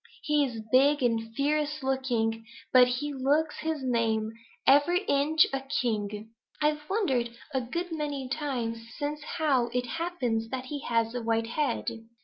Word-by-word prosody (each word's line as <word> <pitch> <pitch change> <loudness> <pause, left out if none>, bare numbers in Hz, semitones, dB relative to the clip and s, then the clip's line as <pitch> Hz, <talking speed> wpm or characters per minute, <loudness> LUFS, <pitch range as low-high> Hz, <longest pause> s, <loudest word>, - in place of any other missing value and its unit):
He 300 -1 +3
is 235 -5 -4
big 280 +2 +5
and 225 -2 0
fierce 300 +1 0
looking, 240 -4 0 0.3
but 250 -1 +8
he 275 +4 -2
looks 290 +4 +1
his 315 -3 -2
name, 225 -3 +1 0.3
every 315 +7 +5
inch 300 -1 +4
a 270 - +1
king. 220 -5 -2 0.3
I've 300 0 0
wondered 255 - 0 0.2
a 265 - +1
good 340 +9 -4
many 290 -4 -3
times 250 -5 -2 0.2
since 295 +1 -3 0.2
how 275 -7 +2
it 245 +1 -1
happens 245 -7 -2
that 260 0 -4
he 285 +2 -4
has 230 -1 +1
a 245 - -3
white 225 0 +1
head." 245 +2 -1
265 Hz, 150 wpm, -28 LUFS, 235-295 Hz, 0.3 s, but